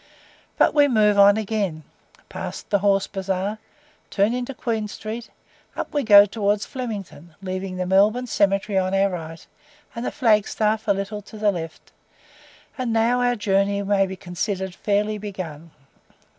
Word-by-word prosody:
But -, -, +4 dB
we 290 Hz, -1 st, +5 dB
move 210 Hz, -5 st, +3 dB
on 200 Hz, +1 st, +7 dB
again 200 Hz, -7 st, -2 dB, 0.4 s
pass -, -, -6 dB
the 200 Hz, -, 0 dB
Horse 195 Hz, 0 st, +2 dB
Bazaar 195 Hz, +2 st, -3 dB, 0.5 s
turn 205 Hz, +3 st, +1 dB
into 250 Hz, +2 st, -4 dB
Queen 225 Hz, -4 st, -2 dB
Street 220 Hz, +3 st, -7 dB, 0.5 s
up -, -, -5 dB
we 290 Hz, -, +1 dB
go 205 Hz, -4 st, +8 dB
towards 205 Hz, 0 st, -1 dB
Flemington, 200 Hz, -, -7 dB
leaving 185 Hz, -1 st, -5 dB
the 180 Hz, -, -2 dB
Melbourne 205 Hz, +7 st, +3 dB
cemetery 195 Hz, -2 st, +1 dB
on 185 Hz, +1 st, -1 dB
our 195 Hz, 0 st, +2 dB
right, 165 Hz, -2 st, -7 dB, 0.5 s
and 235 Hz, -, -5 dB
the -, -, -1 dB
flag 220 Hz, -7 st, +2 dB
staff 220 Hz, 0 st, -1 dB
a -, -, +4 dB
little 200 Hz, +1 st, -3 dB
to 210 Hz, +2 st, -13 dB
the 210 Hz, -1 st, +2 dB
left; 165 Hz, -3 st, -8 dB, 0.9 s
and 250 Hz, -2 st, -1 dB
now 230 Hz, +2 st, +2 dB
our 245 Hz, 0 st, +2 dB
journey 200 Hz, -1 st, +1 dB
may 195 Hz, -1 st, +2 dB
be 190 Hz, -, -6 dB
considered 190 Hz, +1 st, -4 dB
fairly 210 Hz, +2 st, -1 dB
begun. 175 Hz, -6 st, -7 dB
200 Hz, 155 wpm, -23 LUFS, 190-220 Hz, 0.9 s, go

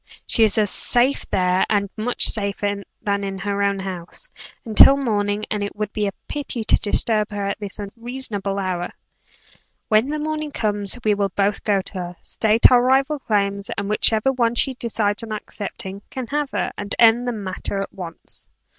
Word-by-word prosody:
She 225 Hz, -, +2 dB
is 215 Hz, -1 st, +3 dB
as 210 Hz, -2 st, +2 dB
safe 250 Hz, +3 st, +3 dB
there, 180 Hz, 0 st, +2 dB
and 200 Hz, -1 st, +1 dB
much 230 Hz, +3 st, -1 dB
safer 200 Hz, -1 st, -1 dB, 0.2 s
than 200 Hz, -1 st, 0 dB
in 195 Hz, -1 st, -4 dB
her 200 Hz, +1 st, -2 dB
own 200 Hz, 0 st, +1 dB
house, 190 Hz, -, -7 dB, 0.4 s
until 230 Hz, +5 st, +7 dB
morning, 210 Hz, -5 st, -1 dB
and 210 Hz, -1 st, -1 dB
it 205 Hz, -, -5 dB
would 210 Hz, -1 st, -4 dB
be 210 Hz, -2 st, 0 dB
a -, -, -1 dB, 0.2 s
pity 280 Hz, -5 st, -4 dB
to -, -, +4 dB
disturb 215 Hz, 0 st, +1 dB
her 205 Hz, -1 st, -3 dB
at 200 Hz, -, -3 dB
this 205 Hz, -2 st, -5 dB
unseasonable 210 Hz, -2 st, -4 dB
hour. 185 Hz, -3 st, -2 dB, 1.0 s
When 220 Hz, +5 st, +3 dB
the 305 Hz, -, -1 dB
morning 305 Hz, 0 st, -3 dB
comes, 210 Hz, -4 st, 0 dB
we 215 Hz, -, +3 dB
will 200 Hz, -1 st, 0 dB
both 200 Hz, +2 st, 0 dB
go 200 Hz, -2 st, +2 dB
to -, -, -8 dB
her 190 Hz, -, -4 dB
together -, -, -30 dB
state 220 Hz, +2 st, +4 dB
our 245 Hz, -1 st, +6 dB
rival 270 Hz, +4 st, +2 dB
claims 200 Hz, -4 st, -1 dB
and 200 Hz, 0 st, -2 dB
whichever 220 Hz, +3 st, +3 dB
one 240 Hz, -2 st, +1 dB
she 265 Hz, +2 st, +2 dB
decides 220 Hz, -4 st, 0 dB
on 225 Hz, -1 st, -7 dB
accepting, 200 Hz, -2 st, -6 dB
can 260 Hz, -2 st, -5 dB
have 295 Hz, -1 st, 0 dB
her, -, -, -2 dB
and 205 Hz, 0 st, -3 dB
end 235 Hz, +1 st, +5 dB
the -, -, +1 dB
matter 200 Hz, -2 st, -4 dB
at 195 Hz, -, -5 dB
once." 170 Hz, -3 st, -9 dB
210 Hz, 190 wpm, -22 LUFS, 200-240 Hz, 1.0 s, until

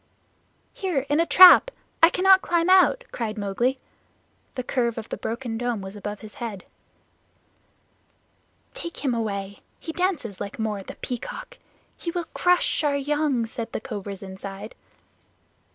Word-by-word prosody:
"Here, 340 Hz, -9 st, -2 dB
in 290 Hz, +2 st, +2 dB
a 335 Hz, -, +2 dB
trap. 365 Hz, +9 st, +9 dB, 0.3 s
I 330 Hz, -, +8 dB
cannot 380 Hz, +1 st, +5 dB
climb 340 Hz, +1 st, +1 dB
out," 380 Hz, +7 st, +5 dB
cried 220 Hz, -2 st, -4 dB
Mowgli. 215 Hz, +6 st, 0 dB, 0.8 s
The 255 Hz, -, -3 dB
curve 240 Hz, -2 st, -1 dB
of 225 Hz, 0 st, -6 dB
the -, -, -3 dB
broken 230 Hz, -1 st, -4 dB
dome 245 Hz, -2 st, -1 dB
was 190 Hz, +1 st, -8 dB
above 205 Hz, 0 st, -6 dB
his 215 Hz, -1 st, -11 dB
head. 210 Hz, -6 st, -5 dB, 2.1 s
"Take 340 Hz, -12 st, -8 dB
him 260 Hz, -, +2 dB
away. 200 Hz, -3 st, -3 dB, 0.2 s
He 325 Hz, -, -6 dB
dances 320 Hz, -, -2 dB
like 200 Hz, 0 st, -6 dB
Mao 215 Hz, -2 st, -2 dB
the -, -, -10 dB
Peacock. 255 Hz, -, -7 dB, 0.4 s
He 340 Hz, -, -5 dB
will 345 Hz, 0 st, -3 dB
crush 355 Hz, -2 st, +2 dB
our 285 Hz, -1 st, +1 dB
young," 285 Hz, -3 st, 0 dB
said 225 Hz, 0 st, -7 dB
the -, -, -2 dB
cobras 205 Hz, -4 st, -7 dB
inside. 195 Hz, +2 st, -8 dB
245 Hz, 145 wpm, -24 LUFS, 210-335 Hz, 2.1 s, trap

